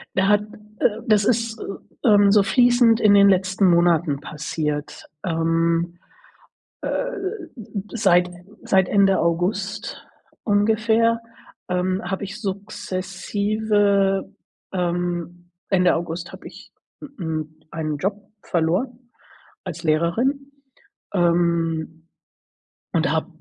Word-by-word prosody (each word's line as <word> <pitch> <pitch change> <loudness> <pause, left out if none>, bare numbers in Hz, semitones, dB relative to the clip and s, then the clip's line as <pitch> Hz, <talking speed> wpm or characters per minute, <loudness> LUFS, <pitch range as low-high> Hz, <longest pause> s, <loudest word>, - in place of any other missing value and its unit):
Da 190 +1 +2
hat, 205 0 +4 0.4
äh 220 +1 +1
das 210 -2 +4
ist, 230 -1 0
äh, 195 - -6
ähm, 205 -1 +6
so 205 -1 +5
fließend 240 0 +4
in 210 -1 +5
den 200 0 +7
letzten 190 0 +2
Monaten 170 -4 +3
passiert. 150 0 -4 0.2
Ähm, 165 +1 0 0.9
äh, - - -2
m 445 -6 -2 0.2
m, 210 -2 -7
seit 180 -5 +3 0.3
seit 190 -1 +2
Ende 195 -1 +4
August 195 +6 -2 0.4
ungefähr, 225 +2 +2 0.5
ähm, 185 +1 -1
habe 190 +2 -3
ich 205 +3 -8
sukzessive, 200 0 -1 0.4
ähm 175 -1 -3 0.2
Ende 180 -1 +4
August 170 +1 -4
habe - - -11
ich, - - -15 0.3
m 285 -2 -11
m 155 -2 -4 0.2
einen 155 -2 -3
Job 200 +5 -2 0.2
verloren 235 +9 -1 0.5
als 170 -2 -6
Lehrerin, 235 - 0 0.6
ähm, 170 -2 0 0.9
und - - +1
habe - - 0
190 Hz, 110 wpm, -22 LUFS, 170-210 Hz, 0.9 s, den